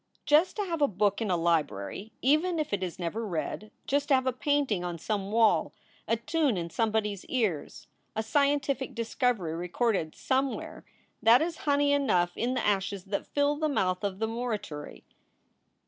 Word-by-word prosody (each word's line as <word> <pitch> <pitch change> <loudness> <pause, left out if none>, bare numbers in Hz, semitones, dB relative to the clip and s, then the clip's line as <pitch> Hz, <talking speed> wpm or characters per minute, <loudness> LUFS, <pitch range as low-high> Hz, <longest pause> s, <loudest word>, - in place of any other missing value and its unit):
Just 305 +5 +4
to 420 - -1
have 335 -5 -3
a 285 - +5
book 205 +1 0
in 220 - -1
a 180 - +2
library, 165 - -1
even 310 +6 +3
if 305 -8 -2
it 200 - 0
is 180 -3 -4
never 185 +6 -3
read; 185 +2 -4 0.2
just 285 +1 0
to 280 - +5
have 260 0 +1
a 260 - +1
painting 270 -8 0
on 175 -1 -3
some 200 +3 -3
wall; 225 0 +3 0.3
a 230 - +2
tune 275 - 0
in 170 -1 -4
somebody 220 -1 +1
s 195 - -10
ears, 215 - -2 0.3
a 220 - -1
scientific 280 +1 +1
discovery 230 -6 0
recorded 180 0 -1
somewhere 265 0 -2 0.4
that 225 +3 +7
is 330 0 -3
honey 285 0 +3
enough 180 -12 +2
in 250 +2 -1
the - - -1
ashes 200 -1 0
that 200 +1 -3
fill 290 0 +1
the 310 0 0
mouth 185 -8 0
of 195 -2 -2
the 220 +2 -1
morituri. 220 -10 -5
225 Hz, 180 wpm, -29 LUFS, 190-280 Hz, 0.4 s, that